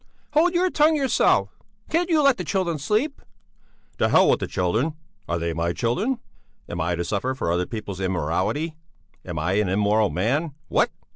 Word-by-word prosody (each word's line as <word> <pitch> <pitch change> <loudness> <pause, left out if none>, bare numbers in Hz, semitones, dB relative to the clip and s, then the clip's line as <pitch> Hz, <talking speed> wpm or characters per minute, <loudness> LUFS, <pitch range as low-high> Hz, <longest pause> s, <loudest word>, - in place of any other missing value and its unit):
"Hold 345 +4 +3
your 365 +1 +2
tongue 310 +1 +4
yourself! 275 -4 +2 0.4
Can't 345 +2 +1
you 315 -3 +3
let 275 -2 +5
the 180 - -3
children 175 -3 -1
sleep?" 215 - 0 0.8
"To - - +3
hell - - +5
with - - +2
the - - -3
children! 110 - 0 0.3
Are 85 - 0
they 85 0 -2
my 85 +1 -1
children? 195 - 0 0.5
Am 85 - -4
I 85 +2 0
to 85 - -2
suffer 115 +8 -1
for 85 - -1
other 90 +1 0
people's 105 -4 -6
immorality? 95 - -1 0.5
Am 85 -3 -6
I 85 +4 0
an 105 -3 +1
immoral 105 +2 +2
man? 135 - -1
What? - - +3
115 Hz, 175 wpm, -24 LUFS, -, 0.8 s, let